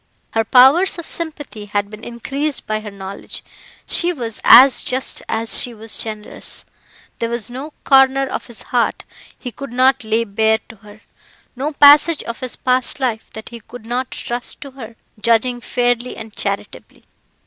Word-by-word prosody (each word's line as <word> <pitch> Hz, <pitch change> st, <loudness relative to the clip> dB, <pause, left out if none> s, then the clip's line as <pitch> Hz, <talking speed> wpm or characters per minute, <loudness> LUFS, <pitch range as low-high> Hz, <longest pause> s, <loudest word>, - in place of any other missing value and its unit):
Her 225 Hz, -, +1 dB
powers 265 Hz, -, +5 dB
of 340 Hz, -, -7 dB
sympathy 295 Hz, -10 st, -6 dB
had 205 Hz, 0 st, -3 dB
been 215 Hz, +1 st, -11 dB
increased 275 Hz, +5 st, -4 dB
by 215 Hz, 0 st, -2 dB
her 215 Hz, -1 st, -8 dB
knowledge; 195 Hz, 0 st, -7 dB, 0.4 s
she 350 Hz, 0 st, +2 dB
was 235 Hz, -9 st, -4 dB
as 255 Hz, +2 st, +8 dB
just 255 Hz, +1 st, -1 dB
as 225 Hz, 0 st, +3 dB
she 245 Hz, -2 st, 0 dB
was 220 Hz, 0 st, -3 dB
generous. 215 Hz, -2 st, -6 dB, 0.5 s
There 230 Hz, -, -2 dB
was 235 Hz, 0 st, -3 dB
no 275 Hz, +5 st, -8 dB
corner 270 Hz, 0 st, +4 dB
of -, -, -5 dB
his 235 Hz, -3 st, -8 dB
heart 245 Hz, -2 st, -1 dB, 0.3 s
he 250 Hz, -, -7 dB
could 275 Hz, +1 st, -9 dB
not 260 Hz, +1 st, +2 dB
lay 220 Hz, +1 st, 0 dB
bare 220 Hz, +1 st, +1 dB
to 225 Hz, -, -13 dB
her; 210 Hz, +1 st, -16 dB, 0.5 s
no 285 Hz, +5 st, -3 dB
passage 295 Hz, +3 st, +6 dB
of 235 Hz, -, -7 dB
his 255 Hz, -2 st, -3 dB
past 255 Hz, +1 st, +1 dB
life 240 Hz, -5 st, -2 dB
that 220 Hz, -, -9 dB
he 235 Hz, -, -10 dB
could 230 Hz, +1 st, -13 dB
not 250 Hz, +2 st, -3 dB
trust 240 Hz, +1 st, -4 dB
to 275 Hz, -, -9 dB
her 235 Hz, -4 st, -11 dB, 0.3 s
judging 240 Hz, +2 st, +2 dB
fairly 245 Hz, 0 st, -1 dB
and 220 Hz, -1 st, -10 dB
charitably. 200 Hz, 0 st, -5 dB
240 Hz, 170 wpm, -18 LUFS, 220-265 Hz, 0.5 s, as